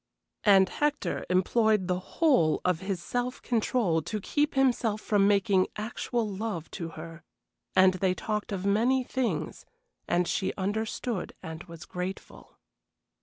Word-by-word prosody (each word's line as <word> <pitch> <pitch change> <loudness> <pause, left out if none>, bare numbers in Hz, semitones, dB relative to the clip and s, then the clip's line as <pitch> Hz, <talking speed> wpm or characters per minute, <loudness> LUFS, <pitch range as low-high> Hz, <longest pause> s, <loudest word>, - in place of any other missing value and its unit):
And 195 -2 +6
Hector 295 +7 -1
employed 210 +2 +2
the 180 -1 0
whole 250 - +2
of 180 -3 +2
his 190 -2 -4
self 245 +1 -2
control 220 -7 +1
to 215 +7 -4
keep 295 +9 0
himself 240 -5 +2
from 205 -2 +2
making 195 -2 +3
actual 230 +1 -2
love 200 -4 -4
to 165 -2 -5
her, 165 +1 -9 0.5
and 185 0 +6
they 185 0 0
talked 210 +1 -3
of 195 -1 -3
many 235 +6 +3
things, 255 -1 -2 0.4
and 175 0 +1
she 190 - -1
understood 215 +2 -2
and 160 0 -7
was 165 -1 -10
grateful. 180 +1 -7
200 Hz, 135 wpm, -28 LUFS, 180-230 Hz, 0.5 s, And